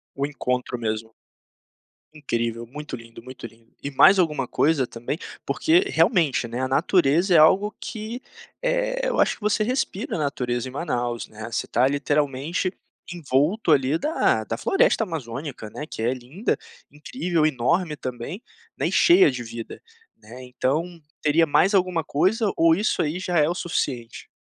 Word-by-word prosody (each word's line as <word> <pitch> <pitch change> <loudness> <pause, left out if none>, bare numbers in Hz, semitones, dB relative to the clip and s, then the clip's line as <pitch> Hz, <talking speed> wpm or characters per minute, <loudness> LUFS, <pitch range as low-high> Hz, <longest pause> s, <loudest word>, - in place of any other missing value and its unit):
O 140 +1 -1
encontro 125 -3 -3
mesmo, 110 0 -4 1.0
incrível, 115 -5 -3
muito 150 +3 -7
lindo, 115 0 -13
muito 130 -1 -9
lindo, 115 0 -20
e 140 - -4
mais 190 +8 +6
alguma 150 -7 +1
coisa 145 -4 +2
também? 120 +6 -5 0.3
Porque 335 +3 +3
realmente, 165 - +2
né, 120 +2 -4
a 130 - -1
natureza 170 +4 +2
é - - +7
algo 195 +7 +5
que 220 +3 -6 0.4
eh, - - 0
eu - - +1
acho - - +2
que - - -24
você 210 +1 +1
respira 250 +1 -2
a - - -4
natureza 125 -4 -2
em - - -10
Manaus, 120 -5 -3
né, 110 +1 -9
você 115 - -2
está 125 +3 +2
literalmente 145 +5 -1 0.4
envolto 160 - +1
ali 140 +2 +2
da 310 - +1
da - - -3
floresta 400 - +2
amazônica 135 - -6
né, 150 - -6
que 110 - -7
é 120 - +1
linda, 135 - -3 0.3
incrível, 165 - -2
enorme 155 +4 0
também 130 - -6 0.3
né, - - -1
e - - -5
cheia 345 - +6
de 125 -2 -5
vida 115 0 -8 0.4
né, 115 +4 -12
então 130 +5 -1 0.4
teria 160 +2 +3
mais 185 +7 +3
alguma 180 -3 +2
coisa, 200 +9 +1
ou 165 0 +5
isso 205 +6 0
aí 155 +3 -2
já 180 -3 0
é 150 - +4
o 170 - -1
suficiente? 135 -10 -3
150 Hz, 160 wpm, -24 LUFS, 125-180 Hz, 1.0 s, é